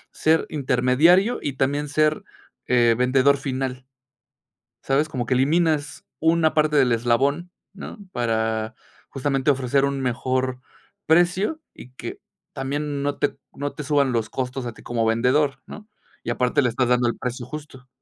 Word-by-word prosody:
ser 160 Hz, +1 st, +2 dB
intermediario, 150 Hz, -, +3 dB
y 145 Hz, -, -2 dB
también 140 Hz, +2 st, 0 dB
ser, 155 Hz, +1 st, +1 dB, 0.4 s
eh, 120 Hz, -2 st, +4 dB
vendedor 130 Hz, +2 st, +3 dB
final, 130 Hz, -2 st, -4 dB, 1.0 s
¿sabes? 140 Hz, +3 st, +1 dB
Como 125 Hz, -4 st, -3 dB
que 130 Hz, -, +1 dB
eliminas 150 Hz, +2 st, +1 dB
una 160 Hz, 0 st, +3 dB
parte 155 Hz, -1 st, +2 dB
del 130 Hz, -4 st, +4 dB
eslabón, 135 Hz, +9 st, +1 dB, 0.2 s
¿no?, 200 Hz, +3 st, -9 dB
para, 110 Hz, -1 st, -1 dB, 0.4 s
justamente, 135 Hz, 0 st, 0 dB
ofrecer 135 Hz, 0 st, +1 dB
un 140 Hz, -1 st, -1 dB
mejor 130 Hz, 0 st, -1 dB, 0.5 s
precio, 180 Hz, -, +2 dB
y 125 Hz, -, -13 dB
que -, -, -7 dB, 0.3 s
también 140 Hz, +1 st, -3 dB
no 145 Hz, 0 st, -2 dB
te -, -, 0 dB, 0.2 s
no 145 Hz, 0 st, -4 dB
te -, -, -6 dB
suban 140 Hz, -2 st, +2 dB
los 115 Hz, -2 st, -1 dB
costos 130 Hz, 0 st, -4 dB
a 120 Hz, -, -4 dB
ti -, -, -16 dB
como 115 Hz, -1 st, -1 dB
vendedor, 125 Hz, +5 st, +2 dB
¿no? 210 Hz, 0 st, -11 dB, 0.4 s
Y -, -, -3 dB
aparte 125 Hz, +4 st, +1 dB
le 125 Hz, -, +1 dB
estás 125 Hz, +2 st, 0 dB
dando 125 Hz, -1 st, +3 dB
el 120 Hz, -, -3 dB
precio 125 Hz, 0 st, -4 dB
justo, 145 Hz, -2 st, -10 dB
135 Hz, 155 wpm, -23 LUFS, 125-150 Hz, 1.0 s, eh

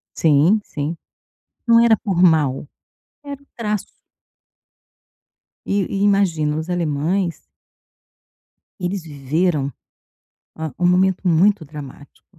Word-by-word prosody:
Sim, 160 Hz, +7 st, +3 dB
sim. 150 Hz, +3 st, -5 dB, 0.7 s
Não 230 Hz, 0 st, +6 dB
era 225 Hz, -2 st, +5 dB
por 190 Hz, -5 st, -1 dB
mal, 150 Hz, -5 st, +3 dB, 0.6 s
era 280 Hz, -1 st, -8 dB
o -, -, -24 dB
traço. 210 Hz, -3 st, -3 dB, 1.7 s
E 200 Hz, -, -1 dB
e 195 Hz, -, -3 dB
imagina, 170 Hz, -7 st, +1 dB
os 160 Hz, +3 st, -5 dB
alemães 170 Hz, +1 st, -1 dB, 1.4 s
eles 180 Hz, 0 st, -3 dB
viveram, 145 Hz, 0 st, -1 dB, 0.8 s
uma 160 Hz, -5 st, -6 dB
um 175 Hz, -, +2 dB
momento 185 Hz, +1 st, +2 dB
muito 180 Hz, +2 st, +3 dB
dramático. 145 Hz, -2 st, -13 dB
170 Hz, 100 wpm, -20 LUFS, 150-195 Hz, 1.7 s, Não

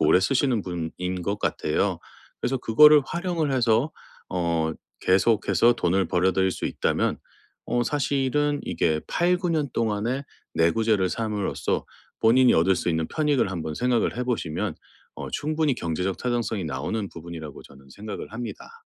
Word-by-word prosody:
오래 80 Hz, +4 st, +5 dB
쓰시는 125 Hz, -1 st, +1 dB
분인 90 Hz, +1 st, -4 dB
것 100 Hz, +4 st, -2 dB
같아요. 75 Hz, -, 0 dB, 0.4 s
그래서 135 Hz, -, 0 dB
그거를 150 Hz, +7 st, +7 dB
활용을 170 Hz, -4 st, -1 dB
해서 120 Hz, +2 st, +2 dB, 0.4 s
어 85 Hz, -3 st, 0 dB, 0.3 s
계속해서 110 Hz, +5 st, +3 dB
돈을 95 Hz, -4 st, +1 dB
벌어들일 95 Hz, +1 st, +2 dB
수 -, -, -3 dB
있다면 -, -, 0 dB, 0.5 s
어 120 Hz, -, +1 dB
사실은 145 Hz, +1 st, 0 dB
이게 80 Hz, -1 st, 0 dB
8-9 180 Hz, +1 st, +1 dB
년 155 Hz, -3 st, 0 dB
동안에 115 Hz, +4 st, -1 dB, 0.3 s
내구재를 95 Hz, +3 st, +2 dB
삼으로써 105 Hz, -3 st, -2 dB, 0.4 s
본인이 125 Hz, +3 st, +5 dB
얻을 95 Hz, +3 st, +3 dB
수 -, -, -2 dB
있는 80 Hz, -1 st, 0 dB
편익을 145 Hz, -9 st, +1 dB
한번 80 Hz, -4 st, -4 dB
생각을 125 Hz, +1 st, +1 dB
해 125 Hz, -, -1 dB
보시면 115 Hz, -11 st, -2 dB, 0.4 s
어 -, -, -6 dB
충분히 155 Hz, -1 st, 0 dB
경제적 90 Hz, -2 st, -2 dB
타당성이 120 Hz, -5 st, -1 dB
나오는 100 Hz, +6 st, -3 dB
부분이라고 80 Hz, -3 st, -9 dB
저는 70 Hz, 0 st, -17 dB
생각을 105 Hz, +7 st, -7 dB
합니다. 285 Hz, -, -8 dB
110 Hz, 320 characters per minute, -25 LUFS, 90-135 Hz, 0.5 s, 그거를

